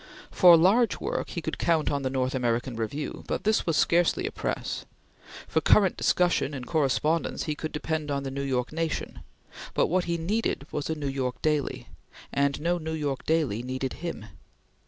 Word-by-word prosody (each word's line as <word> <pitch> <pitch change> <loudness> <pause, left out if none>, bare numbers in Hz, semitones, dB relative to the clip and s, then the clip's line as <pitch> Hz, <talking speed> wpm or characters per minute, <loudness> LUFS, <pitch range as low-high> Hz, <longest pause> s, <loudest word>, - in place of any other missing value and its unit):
For 175 -3 +8
large 200 +7 +3
work - - -3
he 170 - -5
could 160 - -4
count 160 -3 +2
on 140 -1 -1
the 130 - -1
North 130 0 -1
American 120 -1 -1
Review, 115 +7 -4
but - - -2
this 215 -2 +1
was 165 -3 +2
scarcely 175 +1 +3
a - - -2
press. - - -3 0.6
For - - +1
current 195 -4 +4
discussion 175 -5 +1
and 130 -2 -6
correspondence, 155 +2 0
he 155 - -2
could 155 +1 -5
depend 155 0 -3
on 140 -1 -1
the 135 - -4
New 140 +1 -3
York 130 -1 -1
Nation; 165 0 -3 0.6
but - - +4
what 180 +2 +1
he 170 -1 -1
needed 185 -3 -1
was 145 0 -3
a 160 - 0
New 145 -2 -4
York 130 -2 -2
daily, 150 -3 0 0.5
and 140 0 +1
no 175 +3 0
New 160 0 -4
York 145 -4 -3
daily 150 -9 +1
needed 130 +1 -3
him. 165 -11 -5
150 Hz, 185 wpm, -27 LUFS, 135-165 Hz, 0.6 s, For